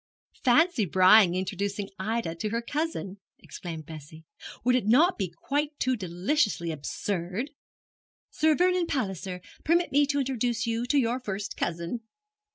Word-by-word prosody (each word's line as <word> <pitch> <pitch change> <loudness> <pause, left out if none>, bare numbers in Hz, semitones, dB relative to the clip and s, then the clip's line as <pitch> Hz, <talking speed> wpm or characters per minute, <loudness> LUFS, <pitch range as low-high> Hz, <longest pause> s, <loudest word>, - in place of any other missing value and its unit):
'Fancy 305 +1 +4
Brian 185 +2 +6
introducing 195 +2 -3
Ida 215 -3 -1
to 190 +6 -3
her 230 +2 -2
cousin!' 285 - -3 0.2
exclaimed 165 -4 -8
Bessie. 160 +1 -11 0.4
'Would 250 +1 +3
it 245 -5 0
not 310 - +5
be 190 -4 -2
quite 290 - -3
too 255 0 +1
deliciously 185 - 0
absurd? 180 - -3 0.8
"Sir 315 0 +3
Vernon 360 0 +2
Palliser, 190 - -3 0.2
permit 345 +3 +2
me 285 +1 +4
to 285 0 0
introduce 245 -3 0
you 230 +1 -1
to 290 - +2
your 245 -1 +1
first 205 -4 -5
cousin!" 170 +8 -3
220 Hz, 140 wpm, -27 LUFS, 185-275 Hz, 0.8 s, Brian